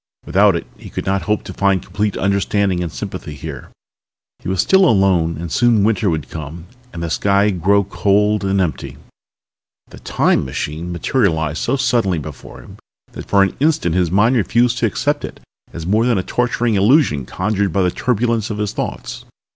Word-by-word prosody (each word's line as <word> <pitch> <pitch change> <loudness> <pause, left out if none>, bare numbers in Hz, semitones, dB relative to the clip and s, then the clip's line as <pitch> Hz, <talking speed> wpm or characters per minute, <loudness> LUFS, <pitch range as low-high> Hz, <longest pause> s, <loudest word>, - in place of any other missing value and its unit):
Without 100 0 +3
it 85 - -3
he - - -11
could - - -5
not 95 0 0
hope 105 - +1
to - - -8
find 100 -3 +1
complete 105 0 -2
understanding 100 -1 0
and 85 -2 -3
sympathy 75 - -7
here. 75 -2 -8 0.7
He - - -6
was 95 -1 -2
still 190 - +4
alone 90 -6 +2
and 85 0 -6
soon 115 -1 +3
winter 105 -2 +1
would 80 -4 -2
come 80 +2 -8 0.3
and 85 - -6
the 85 - -3
sky 100 +2 +2
grow 100 +3 +2
cold 105 +1 +1
and 95 0 +1
empty... 90 -5 -3 0.9
The - - -12
Time - - +1
machine 75 +6 -5
materialized 80 - 0
so 125 - 0
suddenly 120 -9 +1
before 75 -3 -9
him - - -14 0.3
that - - -9
for 100 -1 +4
an 95 - -1
instant 145 - +1
his 90 -1 +1
mind 105 +8 +3
refused 120 +2 +1
to 115 - +2
accept 145 +7 -1
it - - -7 0.3
as 85 -1 -7
more 110 +6 +2
than 120 -4 +2
a 95 - -1
torturing 120 0 0
illusion 100 - +3
conjured 100 +1 -1
up 90 - -6
by 95 - +2
the 90 - +1
turbulence 115 0 -1
of 105 - -4
his 105 -1 -2
thoughts. - - -5
100 Hz, 185 wpm, -18 LUFS, 85-110 Hz, 0.9 s, still